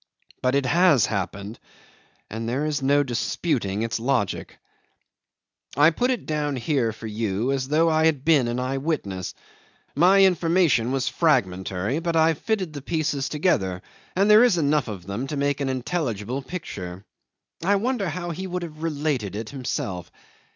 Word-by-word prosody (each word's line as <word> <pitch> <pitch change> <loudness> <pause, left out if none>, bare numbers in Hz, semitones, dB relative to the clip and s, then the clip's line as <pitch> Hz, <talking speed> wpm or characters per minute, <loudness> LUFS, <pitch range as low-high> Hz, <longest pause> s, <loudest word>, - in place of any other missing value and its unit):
But 130 +1 +1
it 140 -1 +1
has 155 - +4
happened 100 +1 -4 0.7
and 115 +2 -4
there 135 +5 -1
is 150 -2 -1
no 140 +2 +3
disputing 120 - -1
its 115 0 -2
logic. 120 -5 -1 1.2
'I 150 +3 +6
put 245 +10 0
it 255 -2 -1
down 150 -2 -1
here 125 -2 0
for 115 +1 -10
you 110 +2 -1
as 135 -1 -1
though 155 +4 +3
I 160 0 +3
had 145 -4 0
been 150 -7 +4
an 120 +1 -2
eyewitness. 130 - -3 0.6
My 185 +6 +6
information 165 -9 +3
was 135 0 -1
fragmentary, 100 - 0
but 170 0 -2
I've 160 -1 +3
fitted 200 -8 -2
the 145 - -6
pieces 150 -2 -1
together, 95 - 0 0.3
and 195 +2 +3
there 215 +2 +8
is 240 -8 +4
enough 150 -3 +1
of 95 -5 -7
them 100 +7 -4
to 150 - -4
make 140 0 0
an 135 - 0
intelligible 130 - -2
picture. 100 - -7 0.6
I 200 +4 +3
wonder 215 -2 0
how 175 +2 -4
he 190 +3 -5
would 180 -1 -3
have 155 -2 -9
related 145 - -2
it 110 0 -5
himself. 95 -9 -4
140 Hz, 160 wpm, -24 LUFS, 115-165 Hz, 1.2 s, there